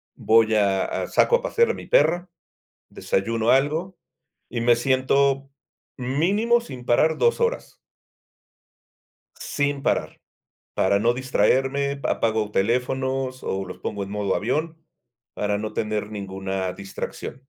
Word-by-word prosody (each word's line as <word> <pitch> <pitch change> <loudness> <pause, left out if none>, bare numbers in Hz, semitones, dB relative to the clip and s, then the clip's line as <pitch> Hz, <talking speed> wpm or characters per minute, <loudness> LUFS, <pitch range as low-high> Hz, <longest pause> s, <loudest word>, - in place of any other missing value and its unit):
voy 110 0 +3
a 100 -2 +2
a - - -3
saco 480 - +3
a - - -10
pasear 470 -1 +2
a - - -4
mi - - -9
perra, 180 - +3 0.6
desayuno 115 +3 -1
algo, 160 +7 +1 0.5
y 120 - -3
me 120 0 +5
siento 135 +2 +1 0.5
mínimo 190 - +1
sin 130 - -10
parar 155 +7 +3
2 470 - +2
horas. 475 +1 -1 1.6
Sin 140 -1 -2
parar, - - -1 0.5
para 100 +1 +2
no 120 +2 +2
distraerme, 135 +3 +1
apago 110 -3 0
teléfonos, 130 +4 -1
o, 95 0 -2
los 90 - -9
pongo 100 -1 -4
en 100 - -10
modo 105 -2 -1
avión 155 +8 -2 0.6
para 105 0 -1
no 105 +1 -4
tener 105 -1 -2
ninguna 95 -2 -4
distracción. 100 0 -7
125 Hz, 125 wpm, -23 LUFS, 105-145 Hz, 1.6 s, me